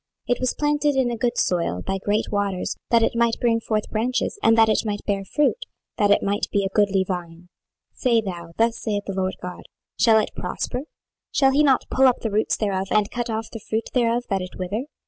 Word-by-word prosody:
26:017:008 245 - +2
It - - -14
was 255 -1 0
planted 295 -1 +1
in 260 -2 +2
a - - -2
good 240 +1 -1
soil 170 - 0
by 195 0 -2
great 210 +3 -1
waters, 200 -3 -1
that 230 -1 +4
it - - +1
might 235 -1 +2
bring 230 -1 +2
forth 215 -1 -2
branches, 250 - -1
and 225 0 +4
that 225 0 +6
it 215 - +2
might 205 -2 -4
bear 200 -1 -1
fruit, 295 - 0 0.3
that 205 - +3
it 205 - +4
might 205 +1 0
be 200 -2 +1
a - - -1
goodly 200 -2 +3
vine. 175 -1 -6 0.4
26:017:009 - - -37
Say 235 -3 +3
thou, 175 -5 -6
Thus 230 0 +2
saith 205 -2 -2
the 195 - -4
Lord 190 0 -1
GOD; 180 0 -7 0.3
Shall 225 -2 +6
it 215 - +1
prosper? 255 +4 -4 0.5
shall 270 -1 +4
he 280 +2 +3
not 275 -4 +3
pull 265 0 +5
up 250 - +2
the 225 - -2
roots 215 +2 +1
thereof, 195 -2 -1
and 210 -1 +2
cut 240 0 -3
off 220 0 -3
the 225 - -7
fruit 220 +1 -3
thereof, 240 -1 +2
that 195 -1 +1
it 185 - -8
wither? 200 +7 -3
220 Hz, 230 wpm, -23 LUFS, 195-240 Hz, 0.5 s, that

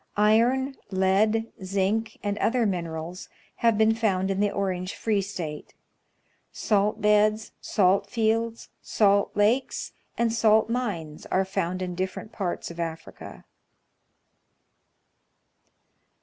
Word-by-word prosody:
Iron, 240 +6 +3
lead, 205 +4 +1
zinc, 200 +4 -1
and 205 -1 -1
other 240 0 +2
minerals, 170 -2 -4 0.3
have 230 -2 +2
been 220 +1 +4
found 195 -4 0
in 195 - -2
the 205 0 +2
Orange 185 -2 -3
Free 215 -3 0
State. 170 -6 -6 0.8
Salt 210 0 0
beds, 210 +1 +3
salt 195 0 +2
fields, 230 0 -1
salt 200 -1 +2
lakes, 225 +6 +1 0.3
and 235 -1 +1
salt 220 0 +3
mines 185 -12 -3
are 190 +1 +1
found 185 -1 -2
in 180 -1 -4
different 185 +4 -4
parts 180 -4 -4
of 170 - -11
Africa. 165 -1 -7
205 Hz, 110 wpm, -26 LUFS, 185-220 Hz, 0.8 s, been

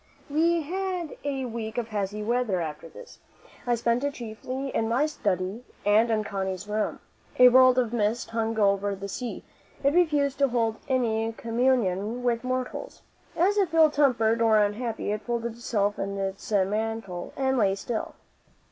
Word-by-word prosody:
We 330 +2 +2
had 365 0 -3
a 275 -2 -2
week 225 -2 -5
of 235 -2 -2
hazy 210 0 -3
weather 235 -4 0
after 155 -3 -5
this. - - -13 0.5
I 240 - +3
spent 235 +2 0
it 285 0 -1
chiefly 250 +4 -5
in 225 0 +1
my 250 +6 +2
study 200 - -2 0.2
and 215 +3 +4
in 220 -1 +1
Connie's 190 -1 -4
room. 210 +1 -2 0.4
A 250 0 +9
world 255 0 +6
of 240 -2 +1
mist 225 +1 0
hung 225 0 -1
over 200 -1 +2
the 195 +1 -6
sea; 235 +4 -5 0.4
it 280 +1 +3
refused 295 -6 +2
to 280 - +4
hold 230 -3 0
any 225 -3 +1
communion 230 -2 0
with 235 -1 0
mortals. 255 - -4 0.3
As 395 +4 +3
if 365 -5 +1
ill 315 -2 +6
tempered 235 -6 +2
or 225 -1 +5
unhappy, 215 +1 0
it 210 0 -2
folded 235 0 -3
itself 210 -3 -1
in 200 0 -3
its 195 +2 -4
mantle 205 -2 -1
and 265 -1 +1
lay 195 -3 +3
still. 220 +3 -4
230 Hz, 165 wpm, -26 LUFS, 210-260 Hz, 0.5 s, A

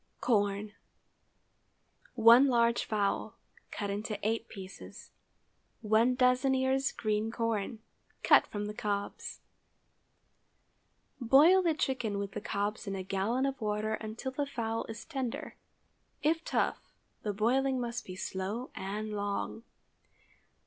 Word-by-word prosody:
CORN. 205 -2 +1
✠ - - -22 1.4
1 235 +3 +8
large 235 -2 +3
fowl, 205 -2 -1 0.3
cut 205 -2 -3
into 210 +1 -3
eight 225 +1 -1
pieces. 190 -1 -10 0.7
1 225 +3 +3
doz. 250 0 +3
ears 265 0 +2
green 215 0 -1
corn—cut 225 -1 0
from 205 0 -4
the 210 - -4
cobs. 205 -1 -4 1.8
Boil 290 +10 +6
the 335 -3 +1
chicken 245 -8 -1
with 200 0 -3
the 210 - -5
cobs 205 +1 -2
in 195 - -2
a 190 - -4
gallon 200 +7 0
of 270 -2 -3
water 215 0 -1
until 220 +4 -4
the 285 +2 -2
fowl 230 -4 -2
is 225 0 -8
tender—if 295 +3 -4
tough, - - 0 0.4
the 210 - -2
boiling 255 +6 +1
must 240 0 -3
be 185 - -8
slow 195 +7 -4
and 210 +3 -4
long. 205 +2 -3
225 Hz, 120 wpm, -31 LUFS, 205-255 Hz, 1.8 s, 1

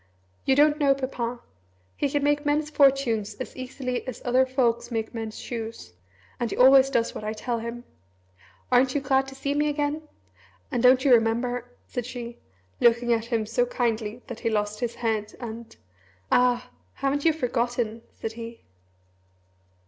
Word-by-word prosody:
You 265 - +4
don't 300 +2 +4
know 280 -2 +4
Papa! 245 -3 -3 0.5
He 285 - 0
can 285 +1 0
make 290 0 +2
men's 300 +1 0
fortunes 260 -8 +3
as 255 - -7
easily 255 -1 -4
as 255 - -5
other 255 +1 +3
folks 240 -2 +1
make 225 -1 -3
men's 225 -2 -5
shoes. 225 - -6 0.5
And 240 - -1
he - - -4
always 265 +1 +7
does 235 -4 0
what - - -7
I 215 +1 -2
tell 230 +2 -3
him. 235 +1 -6 0.9
Aren't 255 +1 +4
you 285 - +1
glad 270 0 +2
to 270 - -9
see 280 +1 -2
me 295 +1 +1
again? 295 +1 -1 0.7
And 245 - 0
don't 255 +2 +5
you 265 - +6
remember 240 +2 +1
?" - - -38
said 245 -2 -4
she, 240 -2 -7 0.4
looking 235 0 +4
at 225 -1 0
him 230 -2 -1
so 245 +3 +1
kindly 230 -1 -2
that 240 -4 -8
he 230 - 0
lost 210 -1 -1
his 240 -1 -2
head 220 -3 -2
and 230 -1 -8 0.6
"Ah! 250 0 +3 0.2
haven't 275 +1 -1
you 330 - +5
forgotten?" 240 -5 -1
said 225 - -4
he. 230 0 -9
245 Hz, 170 wpm, -26 LUFS, 230-270 Hz, 0.9 s, always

